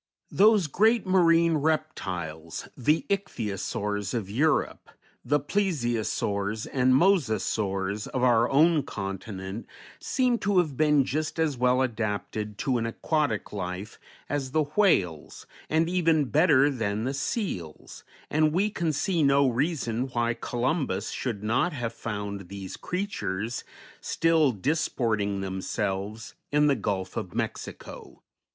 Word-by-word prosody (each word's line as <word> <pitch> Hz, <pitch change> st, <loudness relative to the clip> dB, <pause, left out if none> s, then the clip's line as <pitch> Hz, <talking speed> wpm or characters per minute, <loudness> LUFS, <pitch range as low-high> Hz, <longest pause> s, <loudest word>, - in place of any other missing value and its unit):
Those 210 Hz, -2 st, +5 dB
great 220 Hz, -, +3 dB
marine 170 Hz, -3 st, +4 dB
reptiles, 90 Hz, -, -3 dB
the 150 Hz, +5 st, +1 dB
Ichthyosaurs, 105 Hz, -, -2 dB
of 100 Hz, -4 st, -3 dB
Europe, 150 Hz, +8 st, 0 dB, 0.3 s
the 145 Hz, +1 st, +2 dB
Plesiosaurs 120 Hz, -, -1 dB
and 130 Hz, -1 st, +2 dB
Mosasaurs, 110 Hz, -, +1 dB
of 130 Hz, -, -2 dB
our 120 Hz, -1 st, +4 dB
own 155 Hz, +3 st, +4 dB
continent, 95 Hz, 0 st, -6 dB, 0.3 s
seem 250 Hz, -3 st, +1 dB
to 200 Hz, 0 st, +1 dB
have 160 Hz, -6 st, +2 dB
been 150 Hz, -1 st, +4 dB
just 155 Hz, +4 st, -2 dB
as 160 Hz, -3 st, +1 dB
well 125 Hz, +1 st, +3 dB
adapted 105 Hz, -3 st, -3 dB
to 130 Hz, -4 st, 0 dB
an 115 Hz, -, -1 dB
aquatic 145 Hz, -2 st, -1 dB
life 95 Hz, +1 st, -5 dB, 0.3 s
as 140 Hz, -2 st, -2 dB
the 155 Hz, -1 st, +3 dB
whales, 95 Hz, -, +1 dB, 0.2 s
and 160 Hz, +1 st, +2 dB
even 165 Hz, -4 st, +2 dB
better 145 Hz, -1 st, +4 dB
than 110 Hz, -4 st, -2 dB
the 130 Hz, +3 st, -1 dB
seals, 135 Hz, -, -4 dB, 0.3 s
and 155 Hz, 0 st, +3 dB
we 200 Hz, +5 st, +1 dB
can 170 Hz, -5 st, -1 dB
see 170 Hz, +3 st, 0 dB
no 140 Hz, -1 st, +4 dB
reason 130 Hz, -2 st, -1 dB
why 120 Hz, -2 st, 0 dB
Columbus 120 Hz, -, -2 dB
should 110 Hz, -6 st, -4 dB
not 130 Hz, +11 st, +1 dB
have 120 Hz, -4 st, -3 dB
found 100 Hz, -4 st, -5 dB
these 95 Hz, 0 st, -7 dB
creatures 115 Hz, -, -3 dB, 0.4 s
still 165 Hz, -4 st, +2 dB
disporting 110 Hz, -, -1 dB
themselves 100 Hz, +4 st, -3 dB, 0.2 s
in 150 Hz, +1 st, +4 dB
the 145 Hz, -2 st, +4 dB
Gulf 95 Hz, -4 st, -3 dB
of 90 Hz, -, -5 dB
Mexico. -, -, -6 dB
125 Hz, 125 wpm, -27 LUFS, 105-155 Hz, 0.4 s, Those